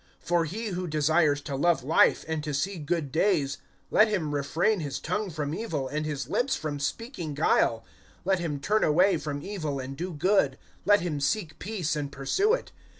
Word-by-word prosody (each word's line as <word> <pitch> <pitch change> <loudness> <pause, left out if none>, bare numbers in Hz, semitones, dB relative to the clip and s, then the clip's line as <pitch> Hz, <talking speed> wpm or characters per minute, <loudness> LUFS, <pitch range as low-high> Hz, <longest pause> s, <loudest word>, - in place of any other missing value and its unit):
(10)For 170 -1 +2
he 220 +7 -4
who 180 -1 -3
desires 155 -1 +2
to 140 - -5
love 165 0 +2
life, 155 +5 +4
and 160 -2 -2
to 150 -2 -2
see 185 +6 -1
good 150 -2 -2
days, 160 -4 +1 0.3
let 215 - +6
him 175 -9 -1
refrain 160 +9 +1
his 145 -4 -3
tongue 210 -1 -2
from 150 -3 -3
evil, 160 -9 -3
and 150 +3 -2
his 140 -4 -3
lips 245 - +1
from 145 -2 -4
speaking 170 - -4
guile; 115 -6 +2 0.4
(11)let 190 -1 +2
him 155 -5 -2
turn 210 +10 +1
away 180 +4 +4
from 145 -2 -4
evil, 155 -9 -3
and 130 +1 -6
do 180 +5 -4
good; 155 -4 +2 0.3
let 205 +1 +5
him 165 -4 -2
seek 165 +3 -1
peace, 185 -6 -2
and 145 -2 -3
pursue 265 - +1
it. - - -8
160 Hz, 190 wpm, -27 LUFS, 145-190 Hz, 0.4 s, let